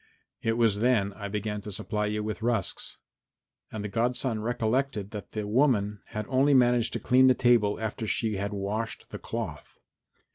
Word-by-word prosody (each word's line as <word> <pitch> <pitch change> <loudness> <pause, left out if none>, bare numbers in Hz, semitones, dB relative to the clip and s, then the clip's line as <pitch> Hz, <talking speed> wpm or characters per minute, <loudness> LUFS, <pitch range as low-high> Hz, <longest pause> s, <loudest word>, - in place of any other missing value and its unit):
It 115 - +1
was 115 -3 +2
then 110 -4 +2
I 100 0 -6
began 105 0 -3
to 105 - -7
supply 105 +2 -2
you 105 0 -2
with 110 +1 -4
rusks." 115 -4 -2 0.7
And 110 -2 -5
the - - -2
godson 120 +1 -1
recollected 115 -2 -1
that 105 -2 -8
the 105 -1 -3
woman 105 -3 +2
had 105 0 -4
only 135 +2 +3
managed 120 -2 +3
to - - -2
clean 130 +1 +5
the 130 - +5
table 120 -5 +3
after 110 0 -3
she 110 -1 0
had 100 +2 -2
washed 105 +3 -4
the - - -6
cloth. - - -6
110 Hz, 175 wpm, -28 LUFS, 105-120 Hz, 0.7 s, clean